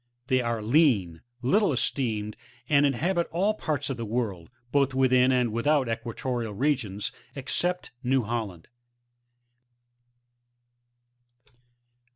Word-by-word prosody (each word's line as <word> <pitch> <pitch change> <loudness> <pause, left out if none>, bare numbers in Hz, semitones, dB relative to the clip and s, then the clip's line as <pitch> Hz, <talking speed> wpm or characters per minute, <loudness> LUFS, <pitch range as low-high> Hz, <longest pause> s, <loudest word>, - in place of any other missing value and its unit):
They 130 -1 +3
are 115 -2 -2
lean, 110 - +3 0.2
little 200 - +3
esteemed, 110 -5 -1 0.3
and 145 0 +4
inhabit 170 +6 0
all 195 +6 +1
parts 150 -8 -2
of 135 - -3
the 115 - -4
world, 105 -7 -3 0.2
both 135 -2 +2
within 130 -1 +4
and 125 -3 +2
without 135 +5 +2
the 115 - -1
equatorial 115 -1 -4
regions, 115 -6 -1 0.2
except 145 +7 -2
New 130 -1 +1
Holland. 105 -7 -4
125 Hz, 110 wpm, -27 LUFS, 115-145 Hz, 0.3 s, and